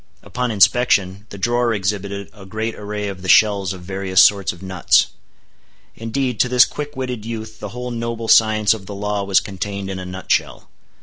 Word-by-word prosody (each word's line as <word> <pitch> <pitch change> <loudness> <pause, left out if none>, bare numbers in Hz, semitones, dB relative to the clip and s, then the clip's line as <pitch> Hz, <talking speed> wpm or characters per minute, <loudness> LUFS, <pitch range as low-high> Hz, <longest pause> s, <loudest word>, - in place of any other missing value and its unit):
Upon 125 0 -3
inspection, 100 -2 +2
the 100 - -9
drawer 120 +2 +1
exhibited 100 0 -3
a 105 -3 -14
great 110 +4 -4
array 105 0 -5
of 95 -2 -7
the 95 - -6
shells 100 -3 +4
of 95 -2 -8
various 95 0 -1
sorts 100 -2 +5
of 85 +2 -13
nuts. 95 -3 +3 0.9
Indeed, 120 +1 -3
to 125 - +3
this 125 -1 +6
quick 145 0 -7
witted 125 -4 -4
youth 110 -1 -7
the 105 - -6
whole 125 +2 -6
noble 115 -1 -4
science 110 -1 +4
of 100 -4 -9
the 100 - -7
law 105 0 -2
was 100 -1 +3
contained 100 0 -5
in 95 - -5
a 90 - -7
nut 95 +1 -7
shell. - - -1
105 Hz, 190 wpm, -20 LUFS, 95-115 Hz, 0.9 s, this